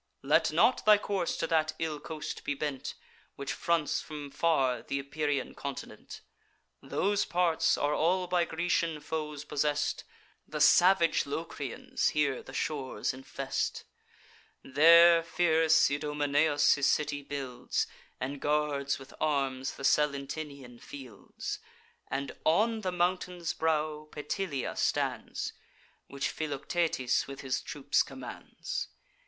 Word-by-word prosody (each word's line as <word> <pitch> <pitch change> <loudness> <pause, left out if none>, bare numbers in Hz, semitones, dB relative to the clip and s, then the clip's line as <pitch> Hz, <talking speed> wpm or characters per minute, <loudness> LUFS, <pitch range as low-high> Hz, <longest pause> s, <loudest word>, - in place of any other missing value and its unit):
Let - - +3
not - - +3
thy 210 -1 +7
course 200 -4 -2
to - - -1
that 155 -1 +1
ill 155 -2 -2
coast 155 -1 -6
be 145 - -1
bent, 140 -2 -4 0.4
Which 140 0 -4
fronts 170 -3 0
from 150 -2 -8
far 135 -7 +1
th' - - -8
Epirian 140 0 -2
continent: 140 -1 -7 0.6
Those 205 +1 0
parts 175 -4 +2
are 145 +1 +1
all 180 +4 +2
by 175 -1 +1
Grecian 165 -1 0
foes 150 -1 -4
possess'd; 150 0 0 0.4
The 150 - -5
salvage 170 +1 +5
Locrians 145 -3 -2
here 140 -3 +1
the - - -12
shores 140 -2 -2
infest; 135 +1 -3 0.8
There 165 +4 +7
fierce 160 -2 +3
Idomeneus 145 0 +2
his 140 0 +1
city 145 0 +1
builds, 140 -3 -3 0.3
And 135 +2 -4
guards 145 -2 0
with 135 0 -13
arms 135 -3 0
the - - -10
Salentinian 140 -3 -1
fields; 130 -7 -8 0.5
And 140 +1 -2
on 220 +7 +2
the 185 -3 -1
mountain's 180 -1 -1
brow 155 -1 -1
Petilia 150 -1 -3
stands, - - -1 0.5
Which 140 0 -2
Philoctetes 150 -2 -1
with 135 0 -8
his 130 -1 -1
troops - - 0
commands. - - -6
150 Hz, 120 wpm, -30 LUFS, 140-165 Hz, 0.8 s, thy